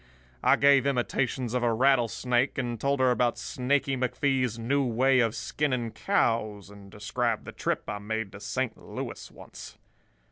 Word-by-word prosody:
I -, -, +5 dB
gave 140 Hz, -1 st, +4 dB
imitations 125 Hz, -2 st, -1 dB
of 125 Hz, -, 0 dB
a 120 Hz, -1 st, +2 dB
rattlesnake, 125 Hz, 0 st, +2 dB
and 120 Hz, -3 st, -3 dB
told 140 Hz, 0 st, +1 dB
her 130 Hz, -1 st, +4 dB
about 120 Hz, -1 st, +1 dB
Snaky 135 Hz, +1 st, -1 dB
McFee's 130 Hz, -2 st, 0 dB
new 135 Hz, +5 st, 0 dB
way 130 Hz, +2 st, +3 dB
of 115 Hz, -2 st, +1 dB
skinning 130 Hz, -6 st, -2 dB
cows, 110 Hz, -, -1 dB
and 100 Hz, -1 st, -13 dB
described 110 Hz, +3 st, -2 dB
the -, -, -7 dB
trip -, -, -2 dB
I 105 Hz, -1 st, -4 dB
made 110 Hz, 0 st, -4 dB
to 100 Hz, -, -10 dB
Saint 110 Hz, +3 st, -2 dB
Louis -, -, -7 dB
once. -, -, -12 dB
125 Hz, 155 wpm, -27 LUFS, 110-130 Hz, -, I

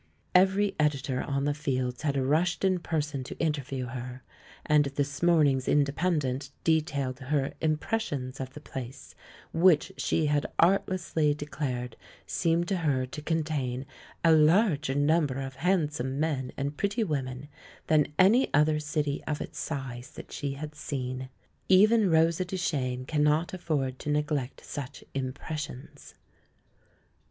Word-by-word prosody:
Every 195 Hz, +2 st, +4 dB
editor 140 Hz, -3 st, +1 dB
on 140 Hz, 0 st, -1 dB
the 145 Hz, -, +1 dB
Fields 130 Hz, -4 st, -2 dB
had 145 Hz, -3 st, 0 dB
rushed 155 Hz, +8 st, +1 dB
in 185 Hz, -1 st, +2 dB
person 150 Hz, -5 st, -2 dB
to -, -, -8 dB
interview 140 Hz, -5 st, -2 dB
her; 125 Hz, +1 st, -7 dB, 0.4 s
and 150 Hz, -1 st, +4 dB
this 140 Hz, 0 st, -3 dB
morning's 150 Hz, -7 st, +3 dB
Independent 145 Hz, -2 st, +1 dB
detailed 140 Hz, -5 st, 0 dB
her 135 Hz, 0 st, -1 dB
"impressions" 150 Hz, -, -1 dB
of 130 Hz, 0 st, -6 dB
the 150 Hz, -, -8 dB
place, 130 Hz, -1 st, -8 dB, 0.4 s
which 165 Hz, -2 st, +4 dB
she 160 Hz, -, +1 dB
had 145 Hz, -1 st, +1 dB
artlessly 170 Hz, -4 st, +2 dB
declared 130 Hz, -5 st, -4 dB, 0.3 s
seemed 170 Hz, +1 st, +1 dB
to 195 Hz, -, +1 dB
her 140 Hz, -6 st, +1 dB
to 145 Hz, +4 st, -8 dB
contain 150 Hz, -5 st, -1 dB, 0.4 s
a 165 Hz, -, +7 dB
larger 155 Hz, -2 st, +4 dB
number 145 Hz, -1 st, +2 dB
of 135 Hz, -1 st, -6 dB
handsome 150 Hz, -6 st, 0 dB
men 140 Hz, -5 st, -1 dB
and 140 Hz, +1 st, -3 dB
pretty 205 Hz, +3 st, 0 dB
women 135 Hz, -6 st, -3 dB, 0.4 s
than 150 Hz, -2 st, +3 dB
any 220 Hz, +8 st, +5 dB
other 150 Hz, +1 st, +4 dB
city 150 Hz, -1 st, -2 dB
of 150 Hz, -1 st, -2 dB
its -, -, -6 dB
size 130 Hz, -3 st, -5 dB
that -, -, -10 dB
she 140 Hz, -2 st, -3 dB
had 150 Hz, +2 st, -7 dB
seen. 130 Hz, -3 st, -4 dB, 0.4 s
Even 210 Hz, +2 st, +6 dB
Rosa 165 Hz, +2 st, +3 dB
Duchcnes 140 Hz, -9 st, -2 dB
cannot 150 Hz, +4 st, +1 dB
afford 145 Hz, -8 st, -2 dB
to -, -, -5 dB
neglect 150 Hz, -3 st, -1 dB
such 140 Hz, -3 st, -7 dB
"impressions." 135 Hz, +1 st, -6 dB
150 Hz, 135 wpm, -28 LUFS, 135-160 Hz, 0.4 s, a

